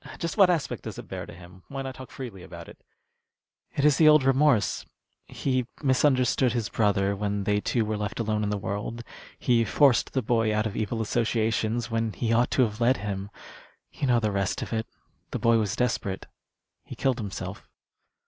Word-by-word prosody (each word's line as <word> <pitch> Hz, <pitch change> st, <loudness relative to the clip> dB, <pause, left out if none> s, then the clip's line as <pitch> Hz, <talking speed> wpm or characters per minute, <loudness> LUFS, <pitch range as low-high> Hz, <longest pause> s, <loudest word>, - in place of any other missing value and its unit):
"Just 170 Hz, -2 st, -3 dB
what 195 Hz, -4 st, +6 dB
aspect 160 Hz, -6 st, -1 dB
does -, -, -7 dB
it -, -, -9 dB
bear -, -, -6 dB
to -, -, -10 dB
him? 90 Hz, +1 st, -14 dB
Why 135 Hz, -1 st, -5 dB
not 135 Hz, 0 st, -5 dB
talk 130 Hz, 0 st, -11 dB
freely 125 Hz, -10 st, -8 dB
about -, -, -10 dB
it?" -, -, -14 dB, 0.9 s
"It 140 Hz, -, +1 dB
is 150 Hz, -2 st, +5 dB
the 160 Hz, -, +6 dB
old 150 Hz, -2 st, +7 dB
remorse. 135 Hz, -3 st, +3 dB, 0.4 s
He 130 Hz, -3 st, -1 dB, 0.2 s
misunderstood 130 Hz, -2 st, +3 dB
his 115 Hz, -3 st, -2 dB
brother 100 Hz, -2 st, +1 dB
when 100 Hz, 0 st, -2 dB
they 105 Hz, +1 st, +1 dB
two 115 Hz, 0 st, 0 dB
were 110 Hz, 0 st, -2 dB
left 105 Hz, +1 st, -4 dB
alone 110 Hz, -1 st, 0 dB
in 105 Hz, -, -1 dB
the 105 Hz, -, -1 dB
world. 100 Hz, +4 st, -4 dB, 0.3 s
He 120 Hz, -2 st, +2 dB
forced 130 Hz, +3 st, +3 dB
the 130 Hz, -, 0 dB
boy 115 Hz, -1 st, +1 dB
out 105 Hz, +1 st, +1 dB
of 110 Hz, -, -3 dB
evil 110 Hz, +1 st, -1 dB
associations 115 Hz, +1 st, 0 dB
when 115 Hz, -1 st, -1 dB
he 115 Hz, -1 st, -1 dB
ought 120 Hz, +2 st, +3 dB
to 130 Hz, -, +3 dB
have 110 Hz, 0 st, -2 dB
led 125 Hz, +3 st, +4 dB
him. 100 Hz, -1 st, -4 dB, 0.6 s
You 140 Hz, -, -3 dB
know 120 Hz, -2 st, +4 dB
the 110 Hz, -2 st, 0 dB
rest 100 Hz, -1 st, -1 dB
of -, -, -6 dB
it. 110 Hz, 0 st, -2 dB, 0.4 s
The -, -, -3 dB
boy 115 Hz, 0 st, +3 dB
was 105 Hz, -1 st, -1 dB
desperate. 110 Hz, -6 st, -1 dB, 0.6 s
He -, -, -9 dB
killed 130 Hz, -3 st, 0 dB
himself." 100 Hz, -3 st, -6 dB
115 Hz, 195 wpm, -26 LUFS, 105-130 Hz, 0.9 s, old